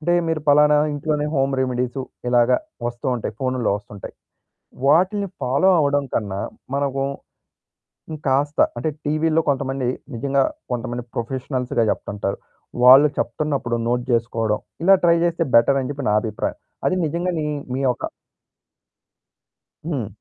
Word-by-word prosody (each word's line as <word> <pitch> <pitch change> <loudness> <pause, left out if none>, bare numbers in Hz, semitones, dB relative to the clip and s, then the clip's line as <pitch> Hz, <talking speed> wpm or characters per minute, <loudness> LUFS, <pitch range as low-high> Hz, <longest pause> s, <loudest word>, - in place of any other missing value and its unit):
అంటే 175 +3 +1
మీరు 160 -1 0
పలానా 150 +1 +6 0.2
ఇంట్లోనే 150 0 -1
హోమ్ 135 0 +1
రెమెడీసు 125 +1 -1 0.3
ఇలాగ 120 -1 +4 0.4
వస్తూ 120 0 -5
ఉంటాయి. 115 - -4
ఫోనుల్లో 130 -4 0
వస్తూ 105 0 -14
ఉంటాయి. - - -9 0.7
వాటిని 190 +6 +3
ఫాలో 140 +9 +3
అవ్వడం 145 -1 +1
కన్నా 100 -3 -2 0.4
మనకు 140 -1 -1 1.1
ఇంకాస్త 145 0 -1 0.2
అంటే 140 - -1 0.2
టీవీల్లో 155 +2 +1
కొంతమంది 135 -2 -1 0.3
నిజంగా 135 +3 +1 0.3
కొంతమంది 120 0 -3
ప్రొఫెషనల్స్‌గా 125 0 -1
చెప్తుంటారు. 100 -1 -3 0.5
వాళ్ళు 135 +4 +9
చెప్తున్నప్పుడు 135 -6 -1
నోట్ 120 0 0
జేసుకోవడం 115 -2 0 0.2
ఇలా 195 +1 +7
ట్రై 170 0 +5
చేస్తే 170 0 0
బెటర్ 135 +4 +5
అని 130 - -4
చెప్పి 140 -2 -5
నా - - +2
అభిప్రాయం. 110 -3 -3 0.3
అది 185 - +2
నిజంగా 170 +4 -1
నీ 150 - -2
మీ, - - -2 0.2
మీ 135 - -2
యొక 125 -1 0 1.8
హ్మ్. 140 -10 -2
135 Hz, 130 wpm, -21 LUFS, 120-150 Hz, 1.8 s, వాళ్ళు